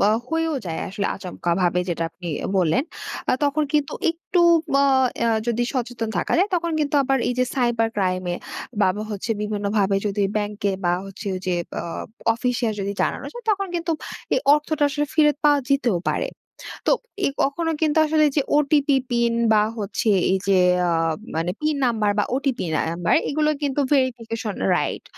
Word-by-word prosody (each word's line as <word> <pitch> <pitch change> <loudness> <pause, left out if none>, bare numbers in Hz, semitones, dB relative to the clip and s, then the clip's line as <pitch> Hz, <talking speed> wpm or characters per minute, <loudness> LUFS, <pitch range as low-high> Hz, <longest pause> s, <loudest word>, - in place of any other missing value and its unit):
বা 205 - +4 0.2
হয়েও 325 -1 0
যায় 160 - -3
আসলে 200 +1 -2
আচমকাভাবে 180 -1 -1
যেটা 165 -1 -1
আপনি 175 0 -8 0.3
বললেন, 185 - +2 0.5
আ - - +3
তখন 295 +1 +1
কিন্তু 295 -2 +1 0.2
একটু 340 +2 -1 0.3
বা 280 0 +5 0.4
আ - - +3 0.2
যদি 240 0 +1
সচেতন 245 -3 -3
থাকা - - -1
যায়, 385 - +3
তখন 340 -1 0
কিন্তু 295 0 -1
আবার 270 0 +1
এই - - +1
যে 255 - +4
সাইবার 240 -3 +1
ক্রাইম 185 -2 0
এ - - -1 0.5
বা 195 - +5 0.2
হচ্ছে 205 +3 -4
বিভিন্নভাবে 205 -1 0
যদি 205 0 0
ব্যাংকে 205 -1 -1
বা 175 - +3
হচ্ছে 195 +2 -9
ওই 185 - -4
যে 180 - +1 0.3
আ - - -5 0.5
অফিসে 245 0 -1
যদি 200 +1 -2
জানানো - - -2
যায়, 485 -1 -9
তখন 395 -1 0
কিন্তু 335 -1 -1 0.4
এই - - +2
অর্থটা 300 0 0
আসলে 295 +1 -1
ফেরত 300 -2 +4
পাওয়া 290 -1 +5
যেতেও 245 -9 +2
পারে। - - -1 0.6
তো - - +5 0.3
এ - - +3 0.2
কখনো 325 +4 0
কিন্তু 310 0 +2
আসলে 310 0 +3
যে 295 - +4 0.2
ওটিপি 290 -1 +3
পিন 235 -1 +1 0.2
বা 210 -1 +5
হচ্ছে 210 +1 -1 0.2
এই 190 - +3
যে 195 -1 +4 0.3
আ - - +1 0.4
মানে 165 +2 0
পিন 305 0 +1
নাম্বার 220 -4 +1
বা 205 - +3
ওটিপি 265 -6 -1
নাম্বার 170 +2 +1
এগুলো 300 +1 +1
কিন্তু 280 0 0
ভেরিফিকেশন 235 -5 -1 0.2
রাইট। - - -2
240 Hz, 170 wpm, -23 LUFS, 200-295 Hz, 0.6 s, বা